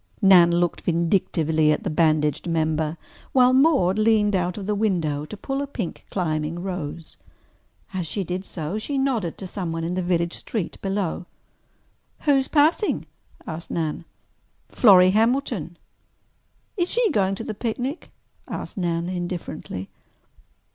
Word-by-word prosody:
Nan 185 -4 +7
looked 175 0 0
vindictively 165 -3 +1
at 150 - -1
the 190 - -2
bandaged 155 -1 +1
member, 160 -1 0 0.4
while 255 -1 +5
Maude 260 - +4
leaned 215 -2 +3
out 180 0 -1
of 200 - -5
the 210 - 0
window 170 -9 0
to 210 - -9
pull 270 +6 -3
a 285 - -3
pink 225 -10 -6
climbing 155 -3 -2
rose. 170 -4 -6 0.8
As 180 -3 -2
she 195 +5 -2
did 180 +2 -4
so 175 +2 -4
she 280 +6 -3
nodded 245 -11 0
to 195 - -7
someone 170 -3 -4
in 170 +2 -2
the 185 - -1
village 175 -1 0
street 210 -7 -4
below. 195 -3 -2 0.9
"Who 295 - +2
is 270 -1 +3
passing?" 315 +7 +2 0.4
asked 165 +1 -6
Nan. 160 -1 -3 0.6
"Florrie 185 -5 +6
Hamilton." 220 - 0 1.0
"Is 355 -1 0
she 475 -4 +2
going 195 -6 +1
to 225 - -6
the 220 - -4
picnic?" 245 - -4 0.4
asked - - -6
Nan 170 -2 -1
indifferently. 175 - -5
185 Hz, 140 wpm, -24 LUFS, 165-220 Hz, 1.0 s, Nan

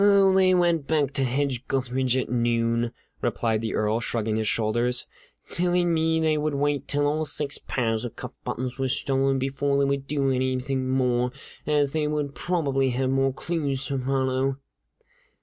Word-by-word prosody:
"Oh, 200 -1 +6
they 185 -1 +5
went 170 -4 +2
back 150 -4 +1
to 135 - 0
Hedge 130 0 -1
gutheridge 130 -1 0
at 130 - -1
noon," 115 -1 +1 0.3
replied 110 -2 0
the 115 - -2
Earl, 110 +1 +1
shrugging 110 -2 -1
his 110 -1 0
shoulders, 120 +3 +1 0.5
"telling 175 0 +1
me 160 0 +2
they 155 -1 +2
would 150 -1 -1
wait 145 0 0
till 145 0 +1
all 150 +2 +1
six 145 -1 -3
pairs 115 -5 0
of 120 - -6
cuff - - -8
buttons 125 +1 -4
were 135 - +1
stolen 135 +1 +1
before 135 +1 0
they 140 - +3
would 140 0 -1
do 140 -2 +1
anything 130 0 -1
more, 125 -1 +1 0.4
as 145 -2 +2
they 155 -1 0
would 150 -1 -1
then - - -18
probably 140 -7 0
have 130 +1 0
more 135 0 +2
clues 140 -2 -2
to 135 -1 -1
follow!" 130 0 0
135 Hz, 175 wpm, -25 LUFS, 125-150 Hz, 0.5 s, Oh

